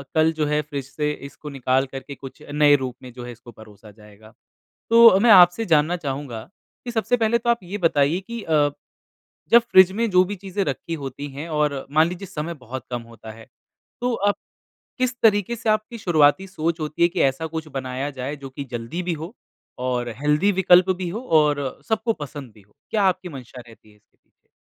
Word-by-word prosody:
कल 160 Hz, +1 st, +4 dB
जो 150 Hz, -, +2 dB
है 150 Hz, 0 st, +1 dB
फ्रिज 145 Hz, -3 st, -6 dB
से 150 Hz, -1 st, -1 dB, 0.2 s
इसको 145 Hz, +2 st, -11 dB
निकाल 130 Hz, +1 st, +1 dB
कर 135 Hz, -, -5 dB
के 140 Hz, +1 st, -10 dB
कुछ 135 Hz, +3 st, -12 dB
नए 145 Hz, 0 st, +5 dB
रूप 125 Hz, -2 st, -5 dB
में 125 Hz, -, -10 dB
जो 125 Hz, 0 st, -9 dB
है 120 Hz, -, -7 dB
इसको 120 Hz, 0 st, -14 dB
परोसा 105 Hz, -1 st, -15 dB
जाएगा। 105 Hz, +1 st, -18 dB, 0.6 s
तो 230 Hz, -4 st, +8 dB
मैं 235 Hz, -, +4 dB
आपसे 180 Hz, +2 st, +7 dB
जानना 155 Hz, +4 st, +2 dB
चाहूँगा, 135 Hz, -5 st, -5 dB, 0.4 s
कि 245 Hz, -, -4 dB
सबसे 235 Hz, +1 st, 0 dB
पहले 235 Hz, 0 st, +2 dB
तो 235 Hz, +1 st, 0 dB
आप 235 Hz, -, +2 dB
ये 185 Hz, +3 st, -6 dB
बताइए 165 Hz, -1 st, +2 dB
कि 235 Hz, +3 st, -7 dB
अ, 150 Hz, -2 st, +2 dB, 0.8 s
जब 235 Hz, -, +8 dB
फ्रिज 185 Hz, 0 st, +7 dB
में 230 Hz, +3 st, 0 dB
जो 185 Hz, -1 st, +5 dB
भी 200 Hz, +3 st, -5 dB
चीज़ें 195 Hz, +1 st, -3 dB
रखी 155 Hz, +3 st, -4 dB
होती 135 Hz, +2 st, -6 dB
हैं 155 Hz, +4 st, -6 dB
और 145 Hz, -3 st, -1 dB
मान 155 Hz, +3 st, +4 dB
लीजिए 180 Hz, +3 st, -7 dB
समय 165 Hz, 0 st, -5 dB
बहुत 130 Hz, +2 st, -7 dB
कम 120 Hz, -1 st, -3 dB
होता 110 Hz, -1 st, -11 dB
है, 110 Hz, 0 st, -14 dB, 0.5 s
तो 245 Hz, 0 st, 0 dB
आप 205 Hz, -1 st, +1 dB, 0.6 s
किस 255 Hz, 0 st, 0 dB
तरीके 205 Hz, 0 st, +3 dB
से 225 Hz, -, -5 dB
आपकी 215 Hz, +2 st, -1 dB
शुरुआती 170 Hz, -1 st, +3 dB
सोच 170 Hz, -3 st, -3 dB
होती 155 Hz, +2 st, -3 dB
है 170 Hz, -, +6 dB
कि 175 Hz, 0 st, -4 dB
ऐसा 135 Hz, +5 st, -4 dB
कुछ 160 Hz, 0 st, -4 dB
बनाया 130 Hz, +2 st, -3 dB
जाए 130 Hz, +3 st, -4 dB
जो 135 Hz, -, -6 dB
की 140 Hz, +2 st, -7 dB
जल्दी 120 Hz, +10 st, -4 dB
भी 175 Hz, -, -2 dB
हो 170 Hz, +5 st, -7 dB, 0.5 s
और 125 Hz, -1 st, -1 dB
हेल्थी 150 Hz, +7 st, +2 dB
विकल्प 180 Hz, 0 st, +5 dB
भी 180 Hz, -1 st, -4 dB
हो 205 Hz, +7 st, -5 dB, 0.2 s
और 150 Hz, -1 st, +2 dB, 0.3 s
सबको 220 Hz, +1 st, 0 dB
पसंद 145 Hz, -4 st, -8 dB
भी 105 Hz, -, -18 dB
हो। 105 Hz, +2 st, -31 dB, 0.2 s
क्या 215 Hz, -, +1 dB
आपकी 185 Hz, -1 st, 0 dB
मंशा 130 Hz, -4 st, -10 dB
रहती 115 Hz, -2 st, -17 dB
है 105 Hz, -, -22 dB
इसके 105 Hz, -, -36 dB
पीछे? -, -, -48 dB
150 Hz, 210 wpm, -22 LUFS, 130-190 Hz, 0.8 s, तो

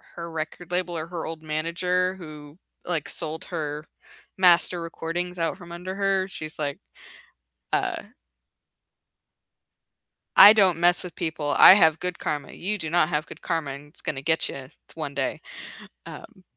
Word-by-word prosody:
her 170 Hz, -1 st, -6 dB
record 165 Hz, +2 st, -6 dB
label 180 Hz, -1 st, -1 dB
or 160 Hz, 0 st, -4 dB
her 170 Hz, -1 st, -5 dB
old 160 Hz, -1 st, -6 dB
manager 170 Hz, +4 st, -1 dB
who, 155 Hz, -4 st, -11 dB, 0.3 s
like, 165 Hz, -4 st, -2 dB
sold 160 Hz, 0 st, -5 dB
her 150 Hz, -3 st, -5 dB, 0.5 s
master 175 Hz, -1 st, +4 dB
recordings 170 Hz, +2 st, -4 dB
out 165 Hz, +1 st, -1 dB
from 175 Hz, -3 st, -12 dB
under 180 Hz, +2 st, -6 dB
her. 195 Hz, -1 st, +1 dB
She's 155 Hz, -5 st, -7 dB
like, 145 Hz, -2 st, -3 dB, 0.9 s
uh -, -, 0 dB, 2.4 s
"I 205 Hz, -, +12 dB
don't 190 Hz, -6 st, +4 dB
mess 175 Hz, +1 st, +3 dB
with 180 Hz, -2 st, -9 dB
people. 150 Hz, -3 st, -2 dB
I -, -, +10 dB
have 160 Hz, -5 st, +4 dB
good 180 Hz, -1 st, -4 dB
karma. 145 Hz, -2 st, -3 dB
You 210 Hz, +4 st, -3 dB
do 160 Hz, -5 st, -5 dB
not 170 Hz, -1 st, +3 dB
have 155 Hz, -1 st, -1 dB
good -, -, -13 dB
karma, 165 Hz, -5 st, -2 dB
and 140 Hz, +2 st, -9 dB
it's 145 Hz, -, -8 dB
gonna 135 Hz, -3 st, -4 dB
get 160 Hz, +3 st, +1 dB
you 130 Hz, -1 st, -8 dB, 0.3 s
one 155 Hz, -3 st, -5 dB
day." -, -, -2 dB, 0.7 s
Um -, -, -12 dB
165 Hz, 155 wpm, -25 LUFS, 155-180 Hz, 2.4 s, I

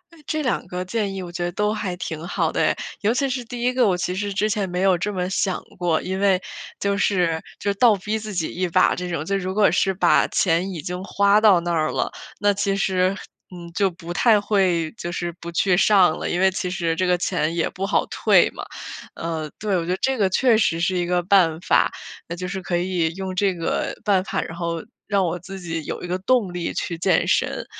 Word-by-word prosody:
哎， -, -, -19 dB
这 310 Hz, 0 st, -1 dB
两 255 Hz, -, -1 dB
个 180 Hz, +1 st, -4 dB
建 205 Hz, 0 st, -2 dB
议 190 Hz, -, -4 dB
我 175 Hz, -, -8 dB
觉 175 Hz, 0 st, -4 dB
得 175 Hz, -, -1 dB
都 210 Hz, +2 st, 0 dB
还 200 Hz, -4 st, -3 dB
挺 165 Hz, -2 st, -5 dB
好 -, -, 0 dB
的 -, -, -1 dB
哎。 -, -, +2 dB, 0.3 s
尤 210 Hz, +2 st, +2 dB
其 275 Hz, +2 st, +1 dB
是 255 Hz, -1 st, -2 dB
第 240 Hz, +1 st, -7 dB
1 250 Hz, +1 st, +2 dB
个， 250 Hz, -4 st, +3 dB
我 180 Hz, -2 st, +2 dB
其 180 Hz, -, -2 dB
实 205 Hz, +2 st, -3 dB
之 210 Hz, +2 st, +1 dB
前 205 Hz, -3 st, -1 dB
没 180 Hz, +1 st, -2 dB
有 190 Hz, -1 st, +4 dB
这 210 Hz, +5 st, -2 dB
么 180 Hz, -2 st, -2 dB
想 190 Hz, -1 st, 0 dB, 0.2 s
过。 170 Hz, -3 st, +1 dB
因 190 Hz, +1 st, -3 dB
为 195 Hz, -2 st, +3 dB, 0.4 s
就 200 Hz, 0 st, 0 dB
是 175 Hz, -5 st, +1 dB, 0.2 s
就 200 Hz, -1 st, 0 dB
倒 225 Hz, +1 st, +5 dB
逼 210 Hz, +3 st, -3 dB
自 215 Hz, -1 st, -7 dB
己 175 Hz, -4 st, -1 dB
一 180 Hz, +1 st, -1 dB
把 185 Hz, +2 st, +3 dB
这 180 Hz, 0 st, -5 dB
种， 160 Hz, -3 st, -3 dB
就 195 Hz, +3 st, -1 dB
如 185 Hz, 0 st, -3 dB
果 210 Hz, -1 st, +4 dB
是 195 Hz, -, +2 dB
把 190 Hz, -, +3 dB
钱 180 Hz, +2 st, +1 dB
已 165 Hz, -, -5 dB
经 180 Hz, +4 st, -5 dB
花 200 Hz, +1 st, +3 dB
到 205 Hz, -5 st, +6 dB
那 175 Hz, 0 st, -2 dB
儿 155 Hz, -2 st, +1 dB
了， -, -, -1 dB, 0.3 s
那 205 Hz, 0 st, +3 dB
其 200 Hz, 0 st, 0 dB
实， 190 Hz, -1 st, +1 dB, 0.3 s
嗯， 170 Hz, -2 st, -10 dB
就 200 Hz, 0 st, +2 dB
不 175 Hz, -1 st, -8 dB
太 220 Hz, +3 st, +4 dB
会 185 Hz, -6 st, +1 dB
就 175 Hz, -, -5 dB
是 175 Hz, 0 st, -3 dB
不 170 Hz, -, -7 dB
去 180 Hz, +2 st, +2 dB
上 190 Hz, -4 st, +5 dB
了， -, -, -3 dB
因 175 Hz, -, -1 dB
为 190 Hz, 0 st, +4 dB
其 185 Hz, 0 st, -3 dB
实 170 Hz, -3 st, -1 dB
这 185 Hz, +2 st, 0 dB
个 180 Hz, 0 st, +3 dB
钱 160 Hz, -1 st, -1 dB
也 170 Hz, -, +1 dB
不 195 Hz, +1 st, -4 dB
好 200 Hz, -, +1 dB
退 -, -, +4 dB
嘛。 -, -, -8 dB, 0.5 s
呃， 160 Hz, -2 st, -4 dB
对， 205 Hz, -2 st, 0 dB
我 165 Hz, -, -2 dB
觉 180 Hz, -, -2 dB
得 185 Hz, -, 0 dB
这 265 Hz, 0 st, +1 dB
个 200 Hz, -4 st, +2 dB
确 235 Hz, +4 st, +3 dB
实 165 Hz, -6 st, +1 dB
是 175 Hz, +2 st, +1 dB
一 175 Hz, -, 0 dB
个 180 Hz, 0 st, +1 dB
办 175 Hz, -4 st, +3 dB
法。 -, -, +3 dB, 0.4 s
那 170 Hz, -, -5 dB
就 180 Hz, +1 st, -5 dB
是 190 Hz, 0 st, -4 dB
可 180 Hz, -, -2 dB
以 175 Hz, -2 st, 0 dB
用 190 Hz, -1 st, -4 dB
这 195 Hz, 0 st, +2 dB
个 165 Hz, -1 st, -2 dB
办 195 Hz, -3 st, +2 dB
法， -, -, -2 dB
然 165 Hz, -, -7 dB
后 170 Hz, -1 st, -3 dB, 0.2 s
让 200 Hz, -2 st, +2 dB
我 175 Hz, +1 st, -2 dB
自 190 Hz, +3 st, -9 dB
己 165 Hz, -2 st, -4 dB
有 -, -, -5 dB
一 -, -, -4 dB
个 180 Hz, +1 st, -1 dB
动 205 Hz, -2 st, +1 dB
力 175 Hz, -1 st, -3 dB
去 170 Hz, -, -3 dB
健 175 Hz, 0 st, +2 dB
身。 -, -, 0 dB
185 Hz, 260 characters per minute, -22 LUFS, 175-200 Hz, 0.5 s, 到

